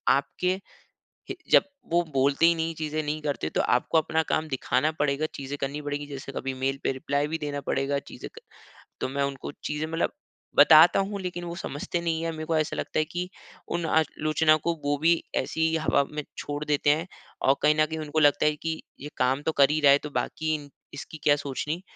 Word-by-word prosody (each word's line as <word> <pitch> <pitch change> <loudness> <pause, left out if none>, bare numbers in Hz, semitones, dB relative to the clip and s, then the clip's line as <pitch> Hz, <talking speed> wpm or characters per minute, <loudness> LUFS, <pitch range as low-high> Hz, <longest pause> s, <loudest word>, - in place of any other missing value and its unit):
आपके 180 +6 -1 0.8
हे - - -5
जब - - +7 0.3
वो 175 0 +4
बोलते 140 +4 +3
ही 170 - +5
नहीं 165 0 -2
चीज़े 155 0 -3
नहीं 150 +1 -3
करते 145 - -2
तो - - 0
आपको 165 - +2
अपना 160 0 +1
काम 155 0 0
दिखाना 130 +1 +1
पड़ेगा 145 +1 +1
चीज़े 140 +1 -5
करनी 140 +2 -3
पड़ेगी 145 0 -4
जैसे 140 -1 -8
कभी 135 0 -3
मेल 135 +1 0
पे - - +2
रिप्लाई 140 +2 -1
भी 160 - -2
देना 145 -2 -3
पड़ेगा 140 +1 0
चीज़े - - -9
क - - -17 0.6
तो - - 0
मैं 140 +1 -1
उनको 140 0 -4
चीज़े 150 +1 -2
मतलब 165 +1 -1 0.4
बताता 160 +4 +8
हूँ। 200 +1 -2
लेकिन 175 -1 -4
वो 170 0 -5
समझते 160 +3 -4
नहीं 165 -1 -1
है 165 - -1
मेरे 155 0 -6
को 165 0 0
ऐसा 155 -1 0
लगता - - -2
है 155 - +2
की 175 +3 -4 0.4
उन 170 -1 -2
आलोचना 155 0 +2
को 170 - +1
वो 145 0 +1
भी 165 +3 +4 0.2
ऐसे 160 - -1
ही 160 0 +2
हवा 155 -3 +2
में 150 0 -4
छोड़ 145 0 -4
देते 145 0 +1
हैं 160 +4 +2 0.4
और 135 - +6
कहीं 150 0 +4
न - - +5
कहीं 160 +1 -5
उनको 155 0 -1
लगता 145 -1 +4
है 150 0 +3
कि 160 -1 -2 0.2
ये 150 - -7
काम 130 +2 +1
तो - - +2
कर 135 - +7
ही 155 - +1
रहा 140 - +7
है 140 - +7
तो 150 - -5
बाकी 155 0 -2 0.4
इसकी 155 +2 -8
क्या 145 - +5
सोचनी 145 +4 -4
150 Hz, 215 wpm, -26 LUFS, 145-160 Hz, 0.8 s, बताता